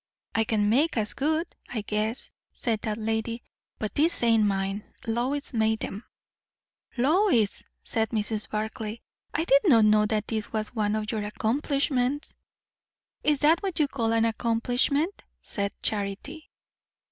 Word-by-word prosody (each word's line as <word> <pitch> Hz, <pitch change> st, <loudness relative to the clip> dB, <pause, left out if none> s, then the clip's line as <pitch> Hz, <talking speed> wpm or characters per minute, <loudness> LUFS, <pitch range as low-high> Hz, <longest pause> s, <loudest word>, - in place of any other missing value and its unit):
"I 225 Hz, -, +2 dB
can 210 Hz, -2 st, +1 dB
make 270 Hz, +7 st, +3 dB
as 215 Hz, -1 st, 0 dB
good, 315 Hz, +4 st, 0 dB, 0.2 s
I 225 Hz, -, -3 dB
guess," 215 Hz, +3 st, -2 dB, 0.2 s
said 225 Hz, -4 st, -1 dB
that 215 Hz, -1 st, -2 dB
lady; 225 Hz, +1 st, -2 dB, 0.3 s
"but 215 Hz, -, -3 dB
these 315 Hz, -2 st, +2 dB
ain't 225 Hz, -2 st, +4 dB
mine. 195 Hz, +1 st, -1 dB, 0.2 s
Lois 255 Hz, +6 st, -1 dB
made 220 Hz, -1 st, +1 dB
'em." 205 Hz, +4 st, -7 dB, 0.9 s
"Lois!" 275 Hz, -, +3 dB, 0.2 s
said 225 Hz, -1 st, 0 dB
Mrs. 215 Hz, -1 st, -1 dB
Barclay. 215 Hz, +1 st, -3 dB, 0.3 s
"I -, -, 0 dB
did 280 Hz, -4 st, +5 dB
not 230 Hz, -, +6 dB
know 210 Hz, 0 st, +5 dB
that 215 Hz, -1 st, -1 dB
this 220 Hz, -2 st, -3 dB
was 215 Hz, 0 st, -2 dB
one 210 Hz, -2 st, 0 dB
of 215 Hz, 0 st, -2 dB
your 220 Hz, -2 st, -1 dB
accomplishments." 265 Hz, +5 st, 0 dB, 0.9 s
"Is 295 Hz, -2 st, +2 dB
that 315 Hz, +3 st, +5 dB
what 385 Hz, -4 st, -3 dB
you 300 Hz, -, +4 dB
call 230 Hz, -5 st, -1 dB
an 225 Hz, 0 st, +3 dB
accomplishment," 245 Hz, -, 0 dB, 0.2 s
said 200 Hz, -1 st, -2 dB
Charity. 215 Hz, +10 st, -3 dB
225 Hz, 145 wpm, -27 LUFS, 215-275 Hz, 0.9 s, not